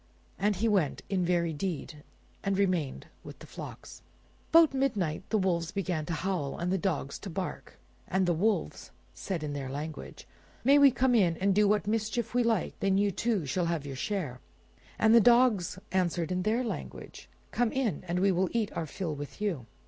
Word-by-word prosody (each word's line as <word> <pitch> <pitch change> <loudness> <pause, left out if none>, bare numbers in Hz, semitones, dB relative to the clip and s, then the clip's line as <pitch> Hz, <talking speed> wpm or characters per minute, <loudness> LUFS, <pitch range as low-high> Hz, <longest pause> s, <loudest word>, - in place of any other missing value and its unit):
And 205 +1 +2
he 215 +5 0
went, 190 -10 +1
in 190 -2 +1
very 170 -2 +1
deed, 155 -2 -4 0.4
and 195 -1 0
remained 180 -8 0 0.2
with - - -10
the - - -12
flocks. - - -10 0.5
About 325 -3 +6
midnight 210 - 0
the 220 - +2
wolves 175 -3 0
began 180 -6 -2
to 170 - -2
howl 165 -4 -2
and 175 +1 -2
the 190 - +2
dogs 165 -7 -2
to 200 - -7
bark, 185 +1 -5 0.3
and 190 0 +1
the 175 - +2
wolves 205 +6 -1 0.2
said 180 -6 -4
in 145 -1 -3
their 140 -2 -4
language— 150 +3 -7 0.4
"May 280 +3 +6
we 285 -1 +8
come 255 0 +1
in 180 -8 +3
and 195 +1 +2
do 210 +1 +4
what 210 0 +2
mischief 220 +2 -1
we 245 - +3
like? 230 -5 0
Then 195 -1 +2
you, 200 0 +2
too, 205 -2 -1
shall 170 +6 -1
have 165 -4 -2
your 140 -1 -6
share." 145 -4 -3 0.6
And 220 +1 +4
the 235 - +8
dogs 235 -6 +4
answered 175 -2 0
in 180 0 0
their 225 +6 +1
language, 230 - -7 0.2
"Come 240 -2 +1
in; 260 -6 -1
and 175 +1 -1
we 195 0 +4
will 185 +1 +1
eat 225 -3 -1
our 160 - -3
fill 165 0 -4
with 145 +4 -8
you." 175 - -2
190 Hz, 195 wpm, -29 LUFS, 165-215 Hz, 0.6 s, we